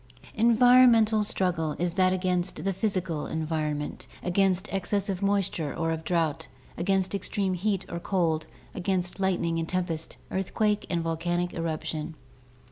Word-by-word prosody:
Environmental 230 -1 +6
struggle 180 -6 -1
is 175 0 -1
that 185 0 +3
against 185 -1 -1
the 195 - +1
physical 185 -5 -1
environment 155 -2 -3
— - - -21
against 185 0 +1
excess 200 +1 -1
of 190 -1 -2
moisture 195 -6 0
or 165 -1 -1
of 160 0 -3
drought, 165 -4 0 0.3
against 190 +1 0
extreme 195 -1 -1
heat 195 +1 -1
or 170 - -5
cold, 170 -4 0 0.3
against 185 0 -2
lightning 175 -3 +1
and 165 - -3
tempest, 175 -3 -2
earthquake 210 +2 0
and 170 -1 0
volcanic 175 +2 -1
eruption. 160 -1 -3
180 Hz, 135 wpm, -27 LUFS, 165-195 Hz, 0.3 s, Environmental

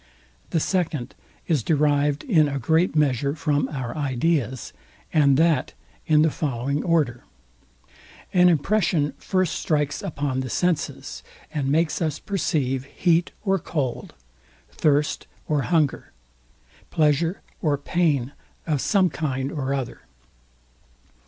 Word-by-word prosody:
The 165 - +1
second 165 -7 -1 0.3
is 155 -7 +2
derived 145 +1 +1
in 165 - +4
a 140 - -2
great 160 +7 +2
measure 140 -1 +1
from 145 -3 0
our 130 -5 -4
ideas, 135 -3 -1 0.4
and 140 -4 +4
that 160 -4 +2 0.3
in 155 -1 +5
the 160 - +3
following 140 0 -2
order. 150 -9 +1 1.1
An 180 -1 +6
impression 170 -2 +1
first 185 -4 0
strikes 150 -2 -1
upon 145 -8 -2
the 130 -1 -3
senses, 175 +4 -1 0.3
and 145 -3 -1
makes 160 +4 +1
us 155 -3 0
perceive 140 -10 -1
heat 170 +3 +1 0.2
or 195 -1 +2
cold, 145 -6 -3 0.6
thirst 150 -1 +1 0.2
or 150 -2 +1
hunger, 155 -3 0 0.8
pleasure 160 +3 +1 0.2
or 150 -3 +1
pain 145 -4 0 0.3
of 150 -4 0
some 190 -4 +2
kind 135 -3 -2
or 135 -3 -3
other. 135 - -3
150 Hz, 120 wpm, -24 LUFS, 140-165 Hz, 1.1 s, An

